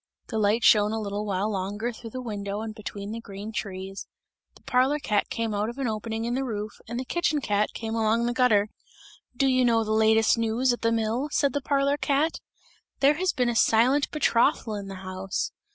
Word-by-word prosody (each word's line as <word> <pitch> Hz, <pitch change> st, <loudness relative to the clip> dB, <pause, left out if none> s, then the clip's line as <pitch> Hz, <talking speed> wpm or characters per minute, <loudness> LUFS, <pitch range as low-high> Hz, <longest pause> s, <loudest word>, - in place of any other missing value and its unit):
The 220 Hz, -, -2 dB
light 215 Hz, +2 st, +2 dB
shone 210 Hz, 0 st, +5 dB
a 225 Hz, -, -1 dB
little 205 Hz, 0 st, -3 dB
while 200 Hz, +2 st, -1 dB
longer 205 Hz, +4 st, -2 dB
through 225 Hz, +1 st, -9 dB
the 255 Hz, +3 st, -6 dB
window 205 Hz, -2 st, -4 dB
and 220 Hz, -1 st, -5 dB
between 205 Hz, -1 st, -7 dB
the 230 Hz, +1 st, -5 dB
green 205 Hz, 0 st, -8 dB
trees; 195 Hz, -2 st, -5 dB, 0.5 s
the -, -, -20 dB
parlour 260 Hz, +4 st, +2 dB
cat 210 Hz, -8 st, 0 dB
came 230 Hz, -2 st, -2 dB
out 210 Hz, +2 st, -1 dB
of 240 Hz, -, -8 dB
an 270 Hz, -2 st, -1 dB
opening 220 Hz, +1 st, -3 dB
in 240 Hz, -, -1 dB
the 265 Hz, +2 st, 0 dB
roof 215 Hz, -4 st, -4 dB, 0.2 s
and 235 Hz, +2 st, -4 dB
the 260 Hz, -, -4 dB
kitchen 315 Hz, 0 st, 0 dB
cat 210 Hz, -5 st, 0 dB
came 225 Hz, -1 st, -4 dB
along 225 Hz, +1 st, +1 dB
the 240 Hz, -, 0 dB
gutter. 220 Hz, -5 st, +3 dB, 0.7 s
"Do 275 Hz, -, +2 dB
you 255 Hz, -1 st, +3 dB
know 230 Hz, -2 st, +3 dB
the 215 Hz, -, -3 dB
latest 220 Hz, +1 st, +4 dB
news 230 Hz, +3 st, +1 dB
at 240 Hz, -, -6 dB
the 230 Hz, -, +2 dB
mill?" 230 Hz, +5 st, 0 dB
said 280 Hz, -3 st, +1 dB
the 285 Hz, -, -1 dB
parlour 280 Hz, +1 st, +1 dB
cat, 290 Hz, +3 st, 0 dB, 0.6 s
"there 285 Hz, +2 st, +4 dB
has 370 Hz, 0 st, +2 dB
been 250 Hz, -1 st, 0 dB
a 235 Hz, -, -1 dB
silent 250 Hz, +6 st, +3 dB
betrothal 245 Hz, -5 st, +2 dB
in 200 Hz, -1 st, -5 dB
the 195 Hz, -, -7 dB
house! 185 Hz, 0 st, -3 dB
225 Hz, 215 wpm, -26 LUFS, 210-255 Hz, 0.7 s, shone